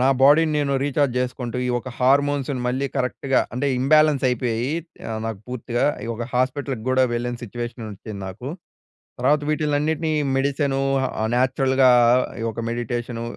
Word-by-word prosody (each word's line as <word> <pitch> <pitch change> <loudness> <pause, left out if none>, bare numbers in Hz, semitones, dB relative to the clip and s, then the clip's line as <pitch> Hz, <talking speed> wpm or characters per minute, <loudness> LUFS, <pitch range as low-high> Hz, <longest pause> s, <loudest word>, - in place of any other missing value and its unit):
నా 130 - +4
బాడీని 155 +3 +6
నేను 140 -1 0
రీచార్జ్ 140 -2 +1
జేసుకుంటూ, 125 -1 -3
ఈ - - -1
ఒక్క 130 +2 -8
హార్మోన్స్‌ని 140 0 +2
మళ్ళీ 130 +3 0
కరెక్ట్‌గా 130 +1 +1
అంటే 130 +4 -1
ఇంబాలెన్స్ 150 0 +4
అయిపోయీ 120 -1 -1 0.4
ఆహ్, 110 0 -3
నాకు 110 -3 -4
పూర్తిగా 120 -1 -2 0.2
ఈ - - -6
ఒక 120 +1 -4
హాస్పిటల్‌కి 130 -1 -1
గూడా 130 0 +4
వెళ్ళిన 120 +1 -2
సిట్యుయేషన్ 120 +1 -6
వచ్చింది 105 +1 -8
నాకు. 100 +8 -7 0.7
తర్వాత 145 +4 +3
వీటినన్నిటిని 155 +1 0 0.2
మెడిసిను, 135 0 0 0.4
ఆ - - 0
న్యాచురల్‌గా 130 +1 +3 0.5
ఈ - - -2
ఒక్క 115 - -5
మెడిటేషను 120 0 -3
130 Hz, 145 wpm, -22 LUFS, 120-140 Hz, 0.7 s, బాడీని